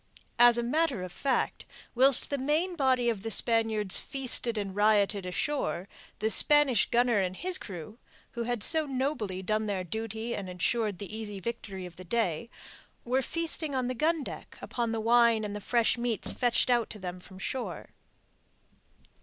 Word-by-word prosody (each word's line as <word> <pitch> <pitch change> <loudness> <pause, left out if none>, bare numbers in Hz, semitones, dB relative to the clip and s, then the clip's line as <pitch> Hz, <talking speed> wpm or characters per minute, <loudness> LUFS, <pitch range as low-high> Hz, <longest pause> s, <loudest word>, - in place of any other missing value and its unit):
As 240 0 +7
a 235 - 0
matter 285 - 0
of 185 - -7
fact, 265 +8 -1 0.3
whilst 260 +2 +5
the 280 - -1
main 310 +7 0
body 260 -5 +2
of 225 -4 -1
the 225 - -4
Spaniards 220 -3 +3
feasted 255 -4 +2
and 195 -2 -4
rioted 205 -2 +2
ashore, 190 -3 -2 0.3
the 220 +1 0
Spanish 295 -6 +4
gunner 240 -2 +2
and 185 -1 -1
his 365 - 0
crew 195 +4 -9 0.3
who 235 - -5
had 235 -2 -2
so 315 +2 +3
nobly 255 -9 -2
done 215 +2 -1
their 195 -3 -2
duty 220 +5 -4
and 195 -2 -6
ensured 205 +3 -1
the 205 +2 -7
easy 210 -3 -6
victory 195 -3 -6
of 175 -1 -11
the 185 - -9
day 185 -1 -1 0.6
were 255 +2 +1
feasting 320 -1 -3
on 255 -1 0
the - - -1
gun 310 +4 0
deck - - -9
upon 235 -2 -3
the 225 - -2
wine 230 0 +4
and 205 -1 -4
the 210 - -6
fresh 235 +2 +1
meats 235 -3 0
fetched 245 0 +1
out 240 -2 +2
to - - -8
them 180 -2 -6
from 185 +1 -14
shore. 195 - -5
230 Hz, 175 wpm, -29 LUFS, 200-255 Hz, 0.6 s, As